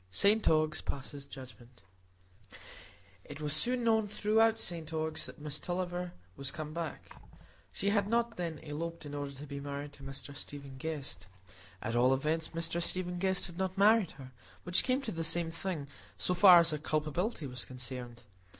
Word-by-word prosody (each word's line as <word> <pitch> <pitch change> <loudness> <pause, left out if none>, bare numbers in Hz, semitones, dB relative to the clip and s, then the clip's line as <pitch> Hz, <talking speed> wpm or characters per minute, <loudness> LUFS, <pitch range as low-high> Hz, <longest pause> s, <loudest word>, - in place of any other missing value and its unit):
St 205 - +4
Ogg's 155 -1 +2
Passes 140 0 -5
Judgment 120 -3 -12 1.4
It 145 0 -9
was 150 -1 +2
soon 245 +9 +4
known 220 -2 +3
throughout 220 +2 +3
St 165 -6 -3
Ogg's 160 0 -1
that - - -10
Miss 150 0 -3
Tulliver 180 0 -3 0.2
was 140 +4 -3
come 155 +1 -5
back; 170 -1 -5 0.5
she 200 +1 0
had 205 -1 +2
not, 235 +1 +1
then, 165 -3 -3
eloped 165 +2 -5
in 145 - -7
order 145 -1 -4
to 140 +2 -9
be 140 -1 -6
married 145 +1 -5
to 140 - -15
Mr 135 +1 -7
Stephen 140 -2 -7
Guest,—at 95 - -6
all 125 +2 +5
events, 155 +4 0
Mr 165 +1 -1
Stephen 180 0 -2
Guest 190 0 +3
had 175 +1 -6
not 190 0 -1
married 210 -2 +5
her; 130 -2 -11 0.3
which 180 +1 +2
came 260 +1 +1
to 230 - -3
the 165 0 -3
same 165 0 +2
thing, 165 -4 -3 0.3
so 180 - +1
far 180 0 +9
as 170 -1 +5
her 150 - -2
culpability 155 +5 -1
was 125 -2 -3
concerned. 125 -1 -6
160 Hz, 170 wpm, -33 LUFS, 140-180 Hz, 1.4 s, far